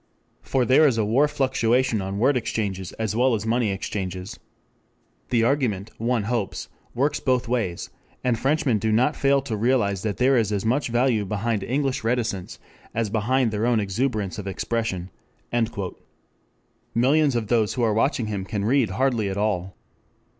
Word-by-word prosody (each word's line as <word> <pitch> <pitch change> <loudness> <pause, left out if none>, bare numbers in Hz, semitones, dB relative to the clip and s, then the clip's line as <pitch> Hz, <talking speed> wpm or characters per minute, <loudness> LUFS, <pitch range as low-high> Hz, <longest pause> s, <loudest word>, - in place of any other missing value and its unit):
For 130 -2 0
there 135 +6 +6
is 125 -5 +1
a 110 - +1
war 130 +8 +3
fluctuation 130 -4 +1
on 95 +1 -4
word 130 +6 +3
exchanges 100 -6 -2
as 110 -1 -3
well 125 +1 +3
as 105 - -3
on 110 - -1
money 120 -2 +1
exchanges. 95 -1 -4 0.9
"The 115 -2 +2
argument, 115 -6 0
one 115 -1 0
hopes, 115 -2 -3 0.3
works 145 +4 +1
both 125 -3 +1
ways, 110 -8 -2 0.3
and 125 -2 +2
Frenchmen 135 -2 +1
do 110 +2 0
not 125 +7 +2
fail 140 0 +2
to 125 -6 -3
realize 105 -4 +1
that 105 -1 -2
there 130 +2 +4
is 110 -3 +1
as 100 0 -1
much 130 +6 +1
value 120 -2 +2
behind 105 +2 -1
English 135 +4 -1
reticence 115 -5 -2 0.4
as 110 -3 -1
behind 115 +2 +1
their 110 +2 0
own 120 -2 +3
exuberance 105 -1 -1
of 100 - -6
expression."] 95 -2 -2 1.8
Millions 140 +3 +3
of 115 -2 0
those 110 -3 +2
who 125 - 0
are 110 -2 +2
watching 120 +2 +1
him 105 -3 -3
can 100 0 -3
read 125 0 +3
hardly 115 0 0
at 95 - -4
all. 95 -3 -1
115 Hz, 170 wpm, -24 LUFS, 105-130 Hz, 1.8 s, there